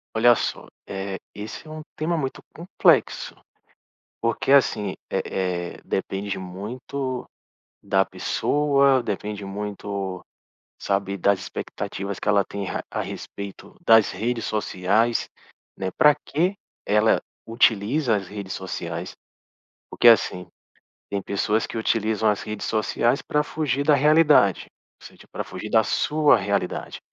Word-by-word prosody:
Olha 120 +2 +6
só, - - -3 0.2
eh, 95 0 -4 0.2
esse 105 +8 -8
é - - -10
um 155 0 -7
tema 165 +2 -1
muito 135 -4 -3
complexo. 175 +4 +2 0.9
Porque 115 +3 -1
assim, 105 -8 +3 0.2
eh - - 0 0.5
eh, - - -16
depende 95 +1 -3
muito 125 +8 -5 0.5
da - - +2
pessoa, 140 -2 +2
depende 105 -1 -4
muito, 100 -1 -4 0.6
sabe, 100 0 -1
das 100 +1 +2
expectativas 100 +1 -5
que - - -4
ela 100 -1 +4
tem 100 0 -5
a - - -3
a - - -3
respeito 100 -1 -8
das 115 -2 +6
redes 115 +4 -2
sociais, 105 +3 +1 0.5
né, 95 -1 -3
para 150 0 +6
que 175 +7 -1 0.3
ela 105 +2 +3 0.3
utiliza 115 +2 +2
as 95 - -4
redes 100 0 -7
sociais. 85 -2 -5 0.8
Porque - - +1
assim, 90 -5 +4 0.6
tem 100 - -1
pessoas 105 +3 0
que - - -6
utilizam 110 -1 +1
as 105 - -1
redes 105 -1 -5
sociais 115 +3 +1
para 150 - +1
fugir 145 -3 -1
da 145 0 +5
realidade. 150 - +4 0.3
Ou - - -14
seja, - - -17
para - - -4
fugir 110 - -8
da 110 -1 +5
sua 150 +1 +3
realidade. 100 -2 -2
110 Hz, 130 wpm, -24 LUFS, 100-130 Hz, 0.9 s, Olha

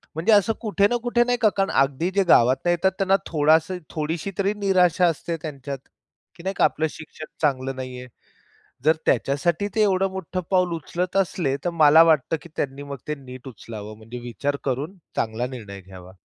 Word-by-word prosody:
म्हणजे 165 +8 +1
असं 205 +2 +4
कुठे 205 -3 +2
ना 240 - +1
कुठे 240 0 +3
नाही 245 0 0
का 220 - +6
कारण 195 0 +1
अगदी 135 +5 +1
जे 200 - +4
गावातून 130 +7 +4
येतात 175 +2 +2
त्यांना 195 0 +3
थोडासा 160 +3 +3 0.2
थोडीशी 160 +4 -3
तरी 200 +1 +2
निराशा 185 -3 +3
असते 165 +1 -2
त्यांच्यात 140 -3 -6 0.6
की 170 - -13 0.2
आपलं 160 - +2
शिक्षण 155 0 -10 0.2
चांगलं 135 -3 0
नाहीये. 130 -1 -7 0.8
जर 160 +1 +5
त्याच्यासाठी 160 +8 +1
ते 220 - +3
एवढं 195 -1 +2
मोठं 185 -1 -4
पाऊल 180 -2 +2
उचलत 175 +3 -4
असले, 170 -7 0
तर - - +2
मला 160 0 +7
वाटतं 160 -2 +2
की 170 - -13
त्यांनी 140 0 -3
मग 140 -1 -7
ते 150 - -2
नीट 130 -2 -11
उचलावं, 110 -3 -9
म्हणजे 115 +3 -9
विचार 120 +4 -3
करून 145 +8 -3 0.2
चांगला 115 +2 -1
निर्णय 105 -6 -8
घ्यावा. 95 -1 -13
155 Hz, 175 wpm, -23 LUFS, 130-185 Hz, 0.8 s, मला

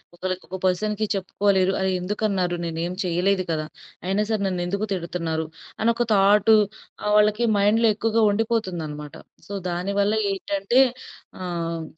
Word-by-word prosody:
ఒకళ్ళకి 185 +1 -4
ఒక 190 - -4
పర్సన్‌కి 210 +4 0
చెప్పుకోలేరు. 190 0 +1
ఆహ్, 190 0 +1
ఎందుకన్నారు? 190 -2 -1
నేనేమి 170 +2 -3
చేయలేదు 185 +2 +1
కదా! 155 -1 -1 0.4
అయినా 195 +3 +1
సరే, 220 -1 +1
నన్నెందుకు 185 +3 -2
తిడతున్నారు? 165 -3 -3 0.4
అనొక 235 +1 +2
థాటు, 205 +2 +5 0.5
ఆహ్, 210 - 0
వాళ్ళకి 210 +2 +3
మైండ్‌లో 215 +3 +4
ఎక్కువగా 225 +1 +1
ఉండిపోతుందనమాట. 180 -10 -2 0.3
సో, 205 - -7 0.2
దాని 180 +3 -2
వల్ల 200 +1 +2 0.2
ఏంటంటే 200 +5 +1 0.6
ఆహ్, 170 -2 -3
195 Hz, 125 wpm, -24 LUFS, 175-210 Hz, 0.6 s, థాటు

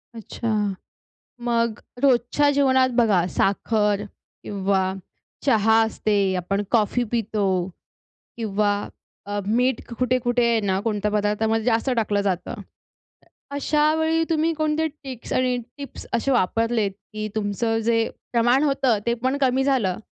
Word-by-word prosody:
अच्छा. 225 +1 -5 1.0
मग 235 -2 0 0.2
रोजच्या 275 +2 +3
जेवणात 260 -2 +3
बघा 200 -7 +3
साखर 210 0 +1 0.4
किंवा 190 -1 0 0.5
चहा 225 -4 +4
असते. 205 -3 0
आपण 195 +3 -1
कॉफी 235 +1 +2
पितो 215 -3 0 0.9
किंवा 210 -2 0 0.5
अ, 205 0 -3
मीठ 250 +4 +1 0.2
कुठे-कुठे 245 -1 +1
आहे 230 -1 +2
ना 190 -2 0
कोणत्या 210 -2 0
पदार्थामध्ये 215 +2 0
जास्त 235 +2 +1
टाकलं 205 -2 +1
जातं? 190 -3 -2 1.0
अशावेळी 315 +3 +2
तुम्ही 325 +1 +1
कोणते 310 0 0
ट्रिक्स 275 -5 -8
आणि 255 -1 +1 0.2
टिप्स 280 -1 -8
असे 270 +4 +1
वापरलेत, 225 -1 +1 0.2
की 215 0 -3
तुमचं 220 +2 0
जे 230 -1 +2 0.2
प्रमाण 240 +4 +3
होतं 270 -5 +2
ते 235 - +2
पण 265 +2 +1
कमी 265 0 +2
झालं 225 -9 +1
230 Hz, 120 wpm, -23 LUFS, 210-260 Hz, 1.0 s, चहा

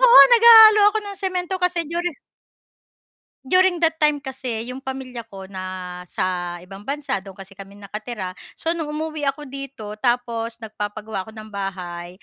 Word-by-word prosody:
Oo, - - +9
naghahalo 445 -2 +9
ako 435 - 0
ng 400 -1 -7
semento 370 -1 -2
kasi 360 -2 +1
duri 345 +1 -2 1.3
during 365 +3 +3
that 325 0 +2
time 300 -2 +2
kasi 260 -5 -4
'yong 255 - -6
pamilya 260 -3 -7
ko 195 -3 -11
nasa 180 -1 -4
ibang 195 +2 -12
bansa, 280 -4 -2
do'n 190 -1 -12
kasi 195 0 -13
kami 195 0 -11
nakatira. 205 -1 -7 0.2
So, 325 - -2
no'ng 335 -2 -1
umuwi 310 -1 -3
ako 295 +2 -1
dito 260 -6 -8
tapos 235 -1 -1
nagpapagawa 210 -2 -5
ako 220 - -12
ng 215 0 -10
bahay. 185 -2 -6
235 Hz, 150 wpm, -22 LUFS, 195-320 Hz, 1.3 s, Oo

